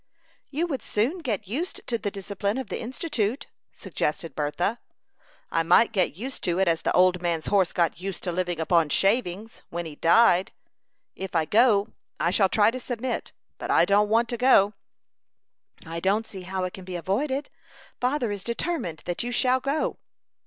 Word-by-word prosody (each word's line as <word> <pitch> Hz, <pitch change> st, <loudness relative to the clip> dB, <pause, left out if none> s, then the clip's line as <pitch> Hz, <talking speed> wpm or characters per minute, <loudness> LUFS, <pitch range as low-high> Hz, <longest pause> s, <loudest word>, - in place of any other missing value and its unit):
"You 310 Hz, +5 st, -1 dB
would 275 Hz, -8 st, -3 dB
soon 245 Hz, -, -1 dB
get 220 Hz, -, -3 dB
used 305 Hz, -, -4 dB
to 235 Hz, -2 st, -1 dB
the 205 Hz, -, -2 dB
discipline 200 Hz, +2 st, -3 dB
of 260 Hz, -6 st, -5 dB
the -, -, -4 dB
Institute," 250 Hz, -2 st, -2 dB, 0.3 s
suggested 165 Hz, +2 st, -3 dB
Bertha. 175 Hz, +10 st, -1 dB, 0.7 s
"I 165 Hz, -, +2 dB
might 175 Hz, +8 st, +4 dB
get 185 Hz, -6 st, 0 dB
used 255 Hz, +6 st, -5 dB
to 175 Hz, -1 st, 0 dB
it 190 Hz, -1 st, +2 dB
as 165 Hz, -1 st, +2 dB
the -, -, 0 dB
old 180 Hz, 0 st, +4 dB
man's 170 Hz, -3 st, -1 dB
horse 195 Hz, -4 st, +2 dB
got 170 Hz, -1 st, 0 dB
used 195 Hz, -1 st, -5 dB
to 180 Hz, -, -1 dB
living 175 Hz, -1 st, -2 dB
upon 165 Hz, -1 st, +2 dB
shavings 205 Hz, -, 0 dB
when 175 Hz, 0 st, -4 dB
he 155 Hz, -2 st, -8 dB
died. 180 Hz, +3 st, +4 dB, 0.6 s
If 190 Hz, -1 st, -6 dB
I 160 Hz, -1 st, +3 dB
go, 210 Hz, +2 st, +4 dB, 0.3 s
I 170 Hz, -, +2 dB
shall 195 Hz, 0 st, +3 dB
try 210 Hz, +2 st, +4 dB
to 255 Hz, -, -5 dB
submit; 245 Hz, 0 st, -3 dB, 0.3 s
but -, -, -5 dB
I -, -, +5 dB
don't 205 Hz, +1 st, +3 dB
want 230 Hz, +2 st, +3 dB
to 240 Hz, -, -2 dB
go." 220 Hz, -5 st, +5 dB, 1.1 s
"I 165 Hz, +1 st, -5 dB
don't 200 Hz, +5 st, +1 dB
see 190 Hz, -4 st, -9 dB
how 185 Hz, +1 st, -3 dB
it 185 Hz, -, -3 dB
can 190 Hz, -, -9 dB
be 180 Hz, 0 st, -7 dB
avoided. 265 Hz, -, -2 dB, 0.5 s
Father 250 Hz, -3 st, 0 dB
is 200 Hz, -2 st, -4 dB
determined 235 Hz, -, -2 dB
that 175 Hz, -1 st, -2 dB
you 245 Hz, +1 st, -3 dB
shall 255 Hz, +1 st, +3 dB
go." 280 Hz, +4 st, -1 dB
200 Hz, 180 wpm, -26 LUFS, 175-240 Hz, 1.1 s, I